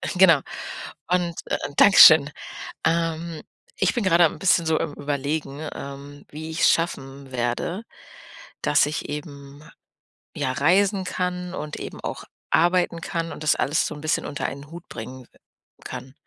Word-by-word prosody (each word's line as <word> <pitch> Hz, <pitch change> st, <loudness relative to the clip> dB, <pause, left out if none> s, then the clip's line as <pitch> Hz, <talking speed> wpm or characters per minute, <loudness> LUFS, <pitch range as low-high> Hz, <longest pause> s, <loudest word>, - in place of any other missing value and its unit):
genau 170 Hz, -6 st, +6 dB, 0.7 s
und 175 Hz, -2 st, +1 dB
äh, -, -, -1 dB, 0.2 s
Dankeschön. 155 Hz, -7 st, +8 dB, 0.5 s
Ähm, 165 Hz, -1 st, -1 dB, 0.4 s
ich 190 Hz, -, +2 dB
bin 240 Hz, -, 0 dB
gerade 175 Hz, -2 st, +5 dB
am 160 Hz, -, 0 dB
'n -, -, -14 dB
bisschen 180 Hz, -3 st, +3 dB
so 160 Hz, -1 st, +2 dB
am 145 Hz, -, -3 dB
Überlegen, 145 Hz, +1 st, -3 dB
ähm, 140 Hz, +1 st, -9 dB
wie 155 Hz, +2 st, -7 dB
ich's 160 Hz, -, +3 dB
schaffen 135 Hz, -5 st, -3 dB
werde, 125 Hz, -, -2 dB, 0.8 s
dass 145 Hz, -1 st, +3 dB
ich 150 Hz, +2 st, -4 dB
eben, 145 Hz, -1 st, -8 dB, 0.7 s
ja, 130 Hz, -, -1 dB
reisen 190 Hz, +7 st, +2 dB
kann 180 Hz, -1 st, -3 dB
und 150 Hz, -3 st, -5 dB
eben -, -, -7 dB
auch -, -, -5 dB, 0.3 s
arbeiten 175 Hz, 0 st, +2 dB
kann 165 Hz, 0 st, -3 dB
und -, -, -9 dB
das 150 Hz, -, +3 dB
alles 150 Hz, +3 st, +1 dB
so -, -, -5 dB
'n 150 Hz, -, -10 dB
bisschen 155 Hz, -, 0 dB
unter 145 Hz, -, -3 dB
einen 140 Hz, +2 st, -8 dB
Hut 170 Hz, +1 st, -11 dB
bringen 125 Hz, +3 st, -8 dB, 0.6 s
kann. 130 Hz, 0 st, -8 dB
155 Hz, 150 wpm, -24 LUFS, 140-175 Hz, 0.8 s, Dankeschön